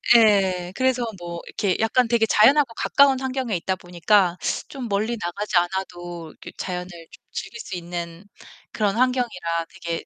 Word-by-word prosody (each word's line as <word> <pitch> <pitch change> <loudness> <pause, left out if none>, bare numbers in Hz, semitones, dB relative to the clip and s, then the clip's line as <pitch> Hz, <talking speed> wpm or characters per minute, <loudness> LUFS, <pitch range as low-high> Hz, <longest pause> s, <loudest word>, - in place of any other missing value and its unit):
예. 190 -5 +4
그래서 260 -2 +1 0.2
뭐 170 -1 -6
이렇게 190 -3 -1
약간 230 +2 +2
되게 230 -1 +3
자연하고 235 +5 +5
가까운 275 -2 +4
환경에 260 -5 -2
있다 185 +2 -2
보니까 180 +1 +2 0.3
좀 260 -4 -6
멀리 215 +3 -1
나가지 180 +2 -2
않아도 175 -2 -3
이렇게 - - -12
자연을 180 -1 -4 0.3
좀 - - -16
즐길 455 - -6
수 190 - -6
있는 170 0 -6 0.5
그런 210 -1 0
환경이라 230 -10 0
되게 170 -1 -5
195 Hz, 335 characters per minute, -23 LUFS, 175-240 Hz, 0.5 s, 자연하고